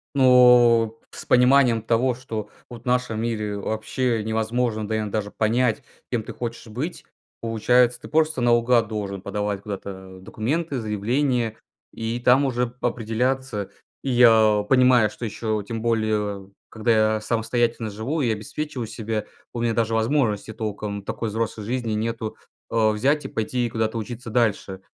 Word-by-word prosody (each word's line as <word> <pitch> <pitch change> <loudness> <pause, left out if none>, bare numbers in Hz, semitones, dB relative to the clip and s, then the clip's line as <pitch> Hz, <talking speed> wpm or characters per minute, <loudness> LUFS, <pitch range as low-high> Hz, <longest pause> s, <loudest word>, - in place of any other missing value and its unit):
Ну, 125 -3 +6
с - - -9
пониманием 125 -2 +4
того, 120 +3 +1
что 115 -4 -6 0.2
вот 120 -1 -10
в - - -32
нашем 125 -3 0
мире 105 -3 -2
вообще 110 +3 -1
невозможно, 110 0 -1
да, 110 - -1
иногда 105 0 -2
даже 105 -1 -6
понять, 115 +1 +1 0.3
кем 120 -3 -1
ты - - -8
хочешь 120 -1 -6
быть. 130 +11 -5 0.4
Получается, 120 +2 +2
ты - - -10
просто 155 -2 +1
наугад 120 -1 +3
должен 100 -3 -4
подавать 105 0 -3
куда-то 95 -2 -7
документы, 135 - -2
заявления- 115 +2 0 0.4
и 115 +1 -3
там 125 +3 +4
уже 125 -2 0
п 120 - -15
определяться. 120 -1 -2 0.3
И 135 - -2
я 110 -4 +5
понимаю, 125 -3 +5
что 120 - -7
еще, 110 -1 -2
тем 115 0 -4
более 105 -4 -1 0.2
когда 110 -1 +2
я 110 - -3
самостоятельно 115 0 -1
живу 120 +10 -3
и 120 -4 +1
обеспечиваю 125 +4 -4
себя, 110 -1 -4 0.3
у 120 - -3
меня 115 -1 +1
даже 115 -1 0
возможности 110 -2 0
толком 105 -2 -4
такой 115 +3 -3
взрослой 110 0 -3
жизни 120 0 -2
нету, 110 0 -3 0.4
э, 110 -1 +3
взять 135 +8 +1
и - - -2
пойти 120 +2 -2
куда-то 110 0 -1
учиться 115 +1 -7
дальше. 105 -4 0
115 Hz, 150 wpm, -23 LUFS, 110-125 Hz, 0.4 s, Ну